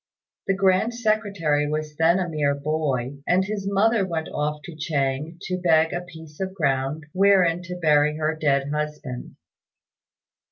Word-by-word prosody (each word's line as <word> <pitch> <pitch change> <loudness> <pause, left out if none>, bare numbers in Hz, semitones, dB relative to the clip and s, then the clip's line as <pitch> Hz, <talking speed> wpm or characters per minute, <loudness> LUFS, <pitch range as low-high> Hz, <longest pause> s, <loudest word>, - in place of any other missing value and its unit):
The 195 - +2
Grand 195 +4 +2
Secretary 200 -10 0
was 155 0 -3
then 165 +3 +4
a 185 -2 -1
mere 150 -3 0
boy, 140 -3 -2
and 185 +1 +3
his 200 -1 -4
mother 210 +2 +3
went 165 -4 -3
off 150 0 -2
to 170 0 -9
Chang 150 0 -2
to 185 - -2
beg 160 -2 +3
a 175 - -2
piece 160 -3 -13
of 190 0 -3
ground 140 -1 -1
wherein 185 -3 +4
to 180 0 -7
bury 150 -3 +3
her 155 0 0
dead 140 -2 +1
husband. 150 -4 -5
160 Hz, 155 wpm, -24 LUFS, 150-185 Hz, -, then